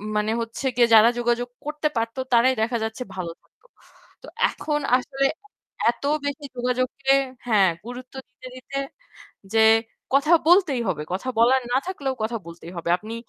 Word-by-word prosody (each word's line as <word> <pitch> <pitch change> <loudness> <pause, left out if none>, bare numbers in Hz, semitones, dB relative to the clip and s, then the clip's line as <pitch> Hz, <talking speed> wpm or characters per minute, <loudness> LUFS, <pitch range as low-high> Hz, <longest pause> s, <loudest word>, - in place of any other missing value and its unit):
মানে 210 +1 +1
হচ্ছে 230 +4 -6
যে 240 - +7
যারা 220 +1 +8
যোগাযোগ 240 0 0 0.2
করতে 300 0 -1
পারতো 230 +2 -2
তারাই 245 +3 +5
দেখা 235 +2 0
যাচ্ছে 220 +3 -4
ভালো 175 -3 -4
থাকতো। - - -36 0.6
তো - - -12 0.2
এখন 295 -1 -2 0.2
আসলে 270 +1 -2 0.5
অ্যা - - +1
এত 240 - -18 0.2
বেশি 285 +1 -4
যোগাযোগকে 255 +2 0 0.3
হ্যাঁ 205 -5 +4 0.2
গুরুত্ব 250 +1 -9
দিতে, 255 - -13
দিতে 270 +2 -7 0.8
যে 225 - +5 0.5
কথা 300 +5 +5
বলতেই 340 -9 +4
হবে। 150 -5 -2
কথা 200 +8 -3
বলার 255 +3 +4
না 260 - +4
থাকলেও 280 -8 -3
কথা 230 +1 -2
বলতেই 170 +1 -10
হবে। 170 0 -4
আপনি 215 +4 -8
245 Hz, 160 wpm, -23 LUFS, 225-275 Hz, 0.8 s, যারা